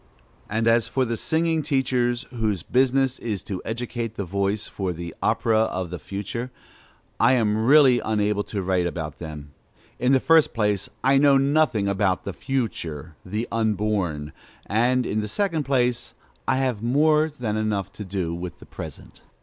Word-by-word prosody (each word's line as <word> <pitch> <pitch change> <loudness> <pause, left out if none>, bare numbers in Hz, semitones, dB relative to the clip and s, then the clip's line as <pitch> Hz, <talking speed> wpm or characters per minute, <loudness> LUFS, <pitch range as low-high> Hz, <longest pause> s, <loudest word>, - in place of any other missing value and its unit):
And 115 +2 0
as 115 0 +4
for 130 +2 0
the 115 -1 -2
singing 160 +5 0
teachers, 130 -4 0
whose 110 -7 -1
business 130 +2 +2
it - - -8
is 105 -4 -2
to 95 -3 -5
educate 115 -1 -4
the 100 - -3
voice 100 +3 -1
for 95 -3 -3
"the 85 0 -7
opera 110 -1 +2
of 95 -5 -1
the 90 - -5
future," 105 +5 -5 0.7
I 120 +3 +5
am 110 -2 +1
really 135 -3 +7
unable 105 -2 0
to 100 -3 -4
write 90 -1 +1
about 80 -3 -5
them. 75 -3 -8 0.5
In 125 +1 +2
the 135 - +5
first 160 -2 +4
place, 105 -4 0
I 135 +1 +5
know 140 -1 +6
nothing 135 -7 +2
about 100 -1 +1
"the 100 - -5
future," 85 - -3
the 105 +5 -3
unborn; 105 -9 -1 0.3
and, 125 +4 +2
in 105 - -1
the 105 - -2
second 165 - -1
place, 125 -3 0 0.3
I 130 - +3
have 130 -5 0
more 150 +6 +3
than 125 -8 -3
enough 105 -3 -1
to 105 - -7
do 95 -4 -3
with 85 0 -6
the - - -14
present. - - -10
110 Hz, 170 wpm, -24 LUFS, 100-130 Hz, 0.7 s, really